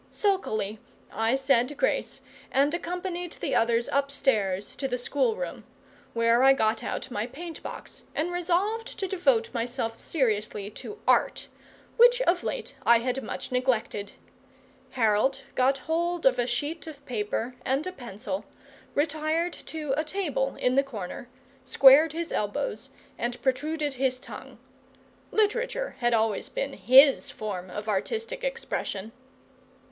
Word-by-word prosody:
Sulkily 220 - -1 0.3
I 225 +3 +2
said 270 0 +2
grace - - 0 0.3
and 280 +3 +3
accompanied 355 0 -3
the - - -3
others 230 +1 +2
upstairs 265 -9 0
to 270 - -1
the 250 -1 -1
schoolroom; 475 - -1 0.5
where 230 +1 +4
I 270 +1 +7
got 220 -4 +1
out 260 - -4
my 215 0 -2
paint 325 +6 -8
box - - -8
and 330 +3 0
resolved 370 +7 -1
to 385 - -2
devote 270 -13 +1
myself 235 -1 -3
seriously 210 -7 -1
to 420 - -8
Art, - - +2 0.5
which 485 +1 +7
of 350 -5 +2
late - - -4
I 235 - +7
had 250 +3 -1
much - - -6
neglected. 235 -5 0 0.8
Harold 250 +4 +2
got 265 +2 +3
hold 335 +5 -1
of 255 -2 +4
a 245 - +1
sheet 290 +7 -3
of 285 -3 -10
paper 225 +1 -2
and 270 +3 0
a 370 - -3
pencil, 250 - -6 0.5
retired 310 +3 0
to 305 -4 -4
a 310 - 0
table 305 -6 -1
in 250 - +1
the 275 - +5
corner, 235 -3 -7 0.3
squared 280 +4 +7
his 335 0 -4
elbows, 210 +3 -2 0.3
and 240 +1 -2
protruded 290 +3 0
his 260 -1 0
tongue. - - -10 0.7
Literature 475 +4 0
had 240 -1 +3
always 220 -2 0
been - - -3
HIS 270 +2 +6
form 190 -4 -5
of 210 +4 -6
artistic 455 - -2
expression. 225 - -3
270 Hz, 135 wpm, -27 LUFS, 230-335 Hz, 0.8 s, I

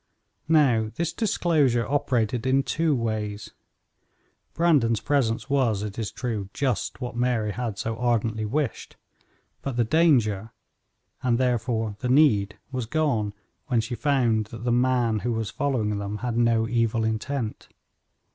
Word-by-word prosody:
Now 125 -9 +4
this 165 -1 -2
disclosure 150 - +1
operated 125 -3 0
in 135 +1 +3
two 160 0 +1
ways. 110 -3 -3 1.0
Brandon's 140 -10 +3
presence 130 -6 0
was, 125 -8 +1
it 105 +1 -5
is 110 - -3
true, 110 -6 -4
just 135 -1 -1
what 125 -1 -4
Mary 120 -3 0
had 115 -2 -4
so 115 +2 -3
ardently 115 -2 0
wished, 135 +3 -3 0.6
but 135 -3 -4
the 120 - +4
danger, 115 - +2 0.7
and, 120 -2 +2
therefore, 115 -4 0
the 125 - -2
need, 115 -8 +4
was 125 -4 -3
gone 120 -7 0 0.3
when 120 -3 +2
she 115 +3 -3
found 120 -5 +1
that 115 0 -9
the 120 - 0
man 120 -2 +2
who 120 +3 -1
was 110 -2 -3
following 115 -4 -1
them 100 +1 -4
had 120 +1 -3
no 115 -1 +2
evil 115 -1 +1
intent. 110 +2 -3
120 Hz, 140 wpm, -25 LUFS, 110-135 Hz, 1.0 s, Now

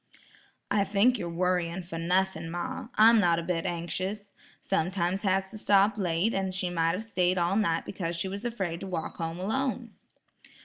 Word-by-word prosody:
"I 200 0 +3
think 210 +5 +3
you're 170 - -3
worrying 180 0 -1
for 165 -1 -6
nothing, 175 -1 0
ma; 175 +1 -4
I'm 225 +1 +7
not 170 -4 +3
a 170 - -2
bit 165 -1 -1
anxious. 185 +4 -3 0.3
Sometimes 185 +1 -1
has 190 -1 0
to 215 - -8
stop 205 +1 +3
late, 180 +3 +1
and 190 -1 -1
she 185 -1 -1
might 165 -1 +1
have 200 - -3
stayed 185 -4 +1
all 175 +2 +1
night 170 -6 +1
because 170 -3 -4
she 170 +3 -2
was 200 +2 -5
afraid 190 -9 -3
to 195 - -6
walk 170 -4 -4
home 165 0 -3
alone." 245 +3 -2
185 Hz, 180 wpm, -28 LUFS, 170-200 Hz, 0.3 s, I'm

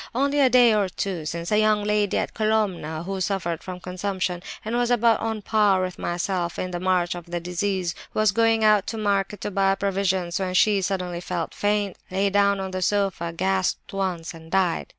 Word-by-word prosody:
Only 280 +3 +1
a 270 -2 +5
day 245 -2 +6
or 205 -3 +1
two 180 -3 -4
since 170 +4 -4
a 210 - +4
young 215 -1 +3
lady 210 -1 +1
at - - -2
Colomna 200 -8 -1
who 195 0 -4
suffered 175 -4 -1
from 185 -1 -7
consumption, 185 -1 -3 0.2
and 225 +2 -2
was 240 0 +1
about 235 -1 +3
on 225 0 -2
a - - -9
par 205 -2 +3
with 185 -1 -5
myself 175 0 -2
in 185 - -3
the 175 - -3
march 180 -1 +1
of 175 -1 -9
the 175 0 -3
disease, 180 0 -2 0.2
was 215 -2 +2
going 225 +1 +2
out 210 -2 +4
to 225 - -4
market 205 -1 -1
to 205 - -3
buy 195 0 +2
provisions, 190 -3 -1
when 185 -1 -2
she 205 +1 +4
suddenly 180 -2 -2
felt 175 -2 -3
faint, 205 -2 0
lay 195 +2 0
down 200 0 +3
on 190 0 -4
the 185 0 -3
sofa, 195 -3 0
gasped 190 +3 -1
once, 185 -4 -2
and 160 -1 -13
died. 185 -2 +1
195 Hz, 205 wpm, -24 LUFS, 180-210 Hz, 0.2 s, day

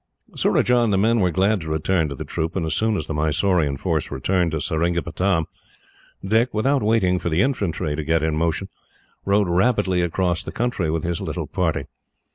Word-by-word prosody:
Surajah 125 0 +2
and 115 -3 +1
the 95 - +2
men 115 +4 +3
were 90 -3 +3
glad 95 +3 +1
to 80 - -6
return 80 +1 0
to 70 - -5
the - - -6
troop, 80 +1 -3
and 90 -4 -1
as 80 - -1
soon 110 +2 +1
as 75 - -3
the 80 - -4
Mysorean 75 -1 +1
force - - -1
returned 85 +6 0
to 80 -1 -2
Seringapatam, 85 +3 0 0.8
Dick, 115 +5 +2
without 135 +6 +2
waiting 105 -4 +2
for 85 - -2
the 80 +2 +2
infantry 100 - -1
to 80 - -3
get 80 +1 +1
in 80 -1 0
motion, 85 +4 -1 0.6
rode 100 0 +2
rapidly 95 0 +2
across 85 0 0
the - - -6
country 115 -8 -1
with 80 0 -1
his 85 -1 -2
little - - -3
party. - - -1
90 Hz, 195 wpm, -22 LUFS, 80-105 Hz, 0.8 s, men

